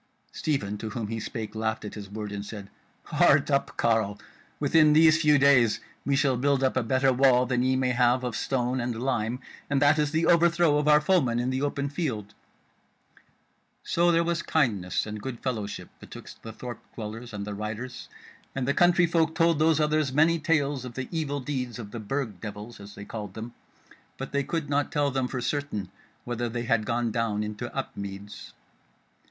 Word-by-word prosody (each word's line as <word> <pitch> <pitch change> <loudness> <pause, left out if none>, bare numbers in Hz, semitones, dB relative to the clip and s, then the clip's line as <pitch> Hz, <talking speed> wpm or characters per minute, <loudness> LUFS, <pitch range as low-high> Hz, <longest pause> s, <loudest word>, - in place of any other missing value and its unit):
Stephen 105 -9 -2
to 110 - -4
whom 110 0 -4
he 115 0 -3
spake 110 +1 -5
laughed 110 0 -2
at 105 - -6
his 100 -2 -8
word, 105 0 -6
and 100 0 -4
said: 100 -1 -9 0.3
"Heart - - +3
up, - - 0
carle! 110 -3 +1 0.4
within 155 -2 +5
these 155 0 +6
few 150 -2 +5
days 135 -5 +4 0.3
we 140 - +3
shall 135 -2 +2
build 135 +1 +1
up 130 - +2
a 130 - +2
better 130 +3 +2
wall 125 -1 +4
than 125 0 0
ye 130 +1 +2
may 130 -1 +1
have 125 +1 +3
of 125 -3 -3
stone 125 0 -1
and 120 -1 -3
lime; 125 -2 -1 0.3
and 140 -1 +2
that 145 +2 +4
is 150 -1 +2
the 160 +2 +1
overthrow 170 -2 +4
of 150 - -1
our 150 0 +6
foemen 150 -8 +2
in 125 +2 0
the 130 +1 -1
open 140 0 -1
field." 130 - -3 1.5
So 175 +1 +2
there 170 0 +3
was 170 0 -1
kindness 105 - 0
and 105 -1 -6
good 125 -1 -5
fellowship 110 -6 -4
betwixt - - -11
the 115 - -8
thorp 120 +1 -7 0.2
dwellers 115 +2 -7
and 100 -1 -5
the 105 - -5
riders, 110 +5 -6 0.5
and 130 -2 -2
the 140 - +2
country 175 +1 +4
folk 165 -1 +1
told 165 -2 +3
those 160 0 +3
others 150 -2 +1
many 160 +4 +3
tales 145 -4 +1
of 125 -2 -8
the 130 -1 -4
evil 150 -4 -2
deeds 130 -3 -4
of 105 -4 -8
the 115 - -6
Burg 110 -2 -3
devils, 105 +2 -8
as 100 0 -11
they 100 - -9
called 105 -3 -7
them; 115 +2 -7 0.6
but 135 - -6
they 140 0 0
could 160 +1 -3
not 145 0 0
tell 145 -1 +1
them 130 -1 0
for 125 -1 -4
certain 125 -8 -3 0.3
whether 120 0 -3
they 120 +1 -3
had 115 -2 +1
gone 120 -1 0
down 105 -2 -1
into 105 -1 -5
Upmeads. 100 +1 -6
125 Hz, 195 wpm, -27 LUFS, 110-145 Hz, 1.5 s, these